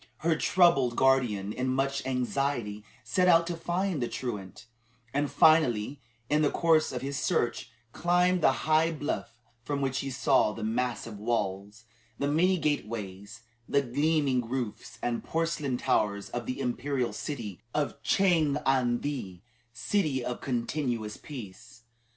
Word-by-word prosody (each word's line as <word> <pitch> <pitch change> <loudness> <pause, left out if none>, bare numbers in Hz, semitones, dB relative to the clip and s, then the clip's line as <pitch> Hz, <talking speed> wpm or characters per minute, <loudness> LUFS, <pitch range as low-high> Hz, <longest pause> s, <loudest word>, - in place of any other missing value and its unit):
Her 165 0 +2
troubled 145 -10 +3
guardian, 120 -7 +2
in 125 +2 -2
much 135 +2 0
anxiety, 125 -4 -1 0.2
set 185 -2 +1
out 170 -1 +6
to 170 0 -3
find 175 -1 -1
the 120 - 0
truant; 105 -6 -6 0.5
and, 145 +1 0
finally, 140 -4 +3 0.3
in 150 +3 +2
the 150 - +3
course 160 -2 +3
of - - -4
his 140 +1 -3
search, 130 -5 0 0.2
climbed 180 +3 +2
the 135 - +5
high 160 +1 +3
bluff 145 -6 -4 0.2
from 140 +3 -3
which 135 -1 -1
he 135 - -3
saw 130 -4 +2
the - - -6
massive 115 -1 -2
walls, 105 -1 -2 0.3
the 140 - -1
many 180 +6 +3
gateways, 105 - -3 0.3
the 140 0 +3
gleaming 140 -2 +1
roofs, 125 -4 -4
and 120 -1 -1
porcelain 165 -5 -1
towers 100 -4 0
of 120 -2 -4
the 130 - -3
Imperial 125 -2 -1
city 105 - -5
of 150 -2 -1
Chang 165 -7 +3
an 125 -3 +2
the 100 -12 -4 0.3
City 135 - -1
of 125 - -4
Continuous 120 -3 -2
Peace. 115 -4 -10
135 Hz, 140 wpm, -29 LUFS, 115-155 Hz, 0.5 s, out